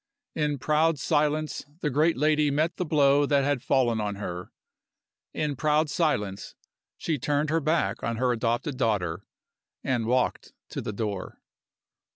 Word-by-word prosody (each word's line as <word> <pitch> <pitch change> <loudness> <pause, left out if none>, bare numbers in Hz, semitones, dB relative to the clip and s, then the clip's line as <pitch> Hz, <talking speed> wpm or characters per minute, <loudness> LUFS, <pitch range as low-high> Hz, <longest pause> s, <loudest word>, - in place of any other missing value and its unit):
In 150 -2 0
proud 155 +3 +2
silence 150 +3 0 0.2
the 150 - 0
great 155 +5 +2
lady 150 +1 +3
met 155 +4 0
the 180 - -1
blow 145 -2 +4
that 140 -1 +3
had 140 -2 0
fallen 120 -4 +2
on 105 -1 -2
her. 90 -3 -6 0.8
In 150 -2 -2
proud 150 +3 +1
silence 105 - -1 0.4
she 155 -4 -2
turned 145 +3 0
her 165 - +3
back 150 -9 0
on 115 - -1
her 125 +2 +1
adopted 120 +4 -1
daughter 95 -9 -1 0.6
and 120 -4 0
walked 125 +1 0 0.2
to - - -4
the - - -4
door. 105 -2 -4
140 Hz, 150 wpm, -27 LUFS, 115-150 Hz, 0.8 s, blow